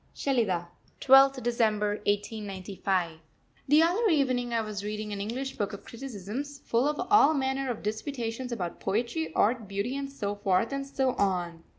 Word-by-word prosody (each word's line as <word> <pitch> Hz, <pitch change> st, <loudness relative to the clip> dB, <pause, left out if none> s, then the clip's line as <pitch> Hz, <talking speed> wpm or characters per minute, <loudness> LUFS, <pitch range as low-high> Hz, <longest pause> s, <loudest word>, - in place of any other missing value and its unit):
SHELIDAH, 210 Hz, -11 st, 0 dB, 0.3 s
12th 270 Hz, 0 st, +6 dB
December 220 Hz, -3 st, +1 dB, 0.2 s
1895. 195 Hz, -4 st, -2 dB, 0.5 s
The 300 Hz, +3 st, +6 dB
other 400 Hz, +7 st, +2 dB
evening 255 Hz, -6 st, +1 dB
I 230 Hz, -1 st, +1 dB
was 210 Hz, -2 st, -5 dB
reading 210 Hz, 0 st, -4 dB
an 200 Hz, -, -4 dB
English 260 Hz, +6 st, -4 dB
book 205 Hz, 0 st, -2 dB
of 200 Hz, -, -9 dB
criticisms, 255 Hz, +3 st, -6 dB
full 235 Hz, +4 st, +2 dB
of 300 Hz, 0 st, -1 dB
all 415 Hz, -7 st, +6 dB
manner 265 Hz, -1 st, -1 dB
of 235 Hz, -, -4 dB
disputations 230 Hz, +2 st, -3 dB
about 180 Hz, -7 st, -4 dB
Poetry, 200 Hz, -7 st, -1 dB
Art, 225 Hz, 0 st, +2 dB
Beauty, 200 Hz, +6 st, -2 dB
and 275 Hz, 0 st, -4 dB
so 205 Hz, -7 st, -3 dB
forth 200 Hz, +1 st, +1 dB
and 275 Hz, 0 st, -3 dB
so 265 Hz, -2 st, +1 dB
on. 175 Hz, -4 st, -1 dB
230 Hz, 160 wpm, -28 LUFS, 200-270 Hz, 0.5 s, 12th